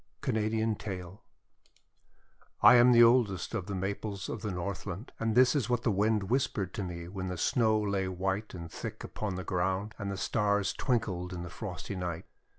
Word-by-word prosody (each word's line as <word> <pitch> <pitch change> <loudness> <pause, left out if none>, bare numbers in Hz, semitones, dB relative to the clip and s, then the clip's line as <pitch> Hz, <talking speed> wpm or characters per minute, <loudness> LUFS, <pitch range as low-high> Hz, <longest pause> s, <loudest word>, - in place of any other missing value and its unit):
Canadian 110 -3 0
Tale 95 -2 -7 1.4
I - - +10
AM 125 0 +7
the 120 -1 +8
oldest 115 -6 +3
of 100 -5 -3
the 100 - -3
Maples 100 0 -3
of 115 - -4
the 105 - -3
Northland, 95 +3 -5
and 115 -1 0
this 130 +1 +6
is 125 -6 0
what 120 -1 +1
the 115 - +2
Wind 105 +1 +2
whispered 100 -4 -1
to 110 - -3
me 85 -2 -6
when 95 0 -5
the 90 0 -4
Snow 110 +4 +2
lay 100 -2 0
white 95 +3 -2
and 85 -2 -8
thick - - -6
upon 105 -3 -4
the 95 - -4
ground, 95 +4 -1
and 100 -1 -3
the 100 - -3
Stars 100 -2 +1
twinkled 95 -8 -1
in 85 -1 -5
the 90 - -8
frosty 90 0 -6
night. 90 -1 -4
100 Hz, 185 wpm, -30 LUFS, 90-110 Hz, 1.4 s, I